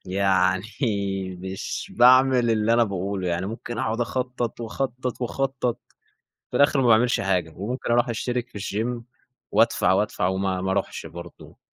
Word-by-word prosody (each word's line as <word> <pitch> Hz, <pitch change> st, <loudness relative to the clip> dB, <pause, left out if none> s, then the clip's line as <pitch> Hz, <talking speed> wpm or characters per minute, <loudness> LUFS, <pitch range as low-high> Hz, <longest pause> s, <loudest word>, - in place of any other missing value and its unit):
يعني 95 Hz, +1 st, +1 dB, 0.7 s
مش 95 Hz, +1 st, -5 dB
باعمل 125 Hz, -1 st, +6 dB
اللي 110 Hz, 0 st, +2 dB
أنا 120 Hz, 0 st, +5 dB
باقوله، 95 Hz, -2 st, -3 dB
يعني 85 Hz, +2 st, -1 dB
ممكن 115 Hz, +2 st, -6 dB
أقعد 110 Hz, +2 st, -1 dB
أخطط 125 Hz, -1 st, -2 dB
وأخطط، 125 Hz, +2 st, -3 dB
وأخطط، 130 Hz, -1 st, -1 dB, 0.7 s
في -, -, -2 dB
الآخر 145 Hz, -1 st, +4 dB
ما 125 Hz, -, +2 dB
باعملش 120 Hz, +1 st, +4 dB
حاجة، 90 Hz, -4 st, 0 dB
وممكن 120 Hz, +5 st, -3 dB
أروح 120 Hz, +1 st, +3 dB
أشترك 120 Hz, +1 st, -2 dB
في 105 Hz, -, -9 dB
الGYM 115 Hz, +4 st, -3 dB, 0.5 s
وأدفع، -, -, +3 dB
وأدفع 95 Hz, -1 st, 0 dB
وما 95 Hz, -1 st, -1 dB
ما 95 Hz, -, -2 dB
أروحش 95 Hz, 0 st, -2 dB
برضو. 85 Hz, +1 st, -11 dB
115 Hz, 145 wpm, -24 LUFS, 95-125 Hz, 0.7 s, باعمل